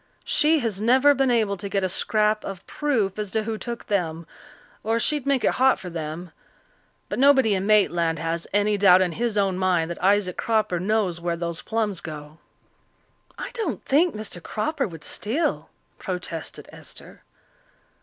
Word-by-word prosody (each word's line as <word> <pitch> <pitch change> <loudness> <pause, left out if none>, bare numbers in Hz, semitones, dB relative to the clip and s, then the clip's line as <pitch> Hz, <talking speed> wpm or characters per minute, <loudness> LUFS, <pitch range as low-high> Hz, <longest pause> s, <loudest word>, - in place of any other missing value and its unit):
She 315 +2 +3
has 215 -4 -2
never 260 +6 +5
been 270 -2 +1
able 220 -5 +1
to 200 +1 -5
get 195 -1 0
a - - +2
scrap 215 +3 +1
of 195 -2 -7
proof 225 -10 -1
as 210 -2 -3
to 220 +2 -1
who 220 0 -4
took 235 -1 -6
them, 170 -5 -2 0.6
or 225 +2 0
she'd 290 +2 0
make 275 -3 +2
it - - +3
hot 265 0 +5
for 180 - -8
them. 165 +1 -6 0.8
But - - -4
nobody 265 -5 +5
in 195 0 -1
Maitland 175 -6 +3
has 165 +1 -3
any 205 +1 +1
doubt 190 -2 +6
in 180 - -1
his 225 +4 -2
own 195 -2 +1
mind 175 -3 +1
that 170 - -7
Isaac 195 -1 +2
Cropper 215 -6 0
knows 190 -3 0
where 170 -1 -2
those 170 -1 -4
plums 220 -4 -2
go." 150 0 -9 1.0
"I - - -6
don't 445 -10 -3
think 315 +3 +2
Mr. 210 -4 -5
Cropper 245 - -2
would 165 -5 -11
steal," 255 +11 -2 0.3
protested 180 -4 -5
Esther. - - -12
205 Hz, 170 wpm, -24 LUFS, 175-230 Hz, 1.0 s, doubt